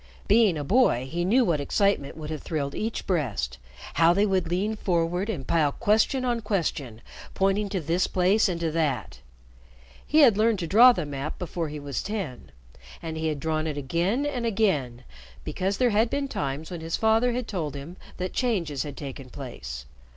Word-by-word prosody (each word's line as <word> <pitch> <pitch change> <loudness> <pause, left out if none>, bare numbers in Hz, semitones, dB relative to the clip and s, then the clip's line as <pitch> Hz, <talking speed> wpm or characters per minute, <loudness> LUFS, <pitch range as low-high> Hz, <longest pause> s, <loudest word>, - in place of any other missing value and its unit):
Being 210 -5 +4
a 145 - -3
boy, 145 - +3
he 170 +5 -2
knew 235 +7 +3
what 160 -5 +1
excitement 160 -2 0
would 155 -1 -6
have 155 - -4
thrilled 140 -4 -3
each 225 +1 -3
breast, 105 - -1 0.3
how 165 +1 +5
they 200 +2 +3
would 190 -4 0
lean 200 +5 0
forward 180 0 0
and 150 -12 -3
pile 155 -2 +2
question 230 +4 +2
on 240 -2 0
question, 155 - -2 0.3
pointing 195 +1 +1
to 190 -1 -1
this 170 +3 0
place 190 +4 +3
and 170 -2 -2
to 165 -1 0
that. 150 -8 -1 0.8
He 310 +1 +3
had 230 -8 +6
learned 225 0 +3
to 180 - -3
draw 230 +9 +8
the 175 -9 -2
map 145 +1 -5
before 170 -2 -4
he 150 0 -6
was 140 -2 -4
ten, 185 - -5 0.5
and 160 -1 -4
he 160 0 -2
had 150 -2 -2
drawn 155 +1 -1
it 150 -2 -3
again 175 - 0
and 260 -5 -2
again 155 - 0 0.4
because 195 +2 -2
there 250 -2 +3
had 220 +3 +3
been 280 +2 -1
times 145 - -4
when 175 -2 -5
his 165 0 -2
father 225 +2 +3
had 245 -1 -3
told 155 -8 -3
him 145 +6 -8 0.2
that 185 0 -3
changes 175 - -1
had 145 -2 -6
taken 135 -2 -7
place. 65 - -7
175 Hz, 190 wpm, -26 LUFS, 145-210 Hz, 0.8 s, draw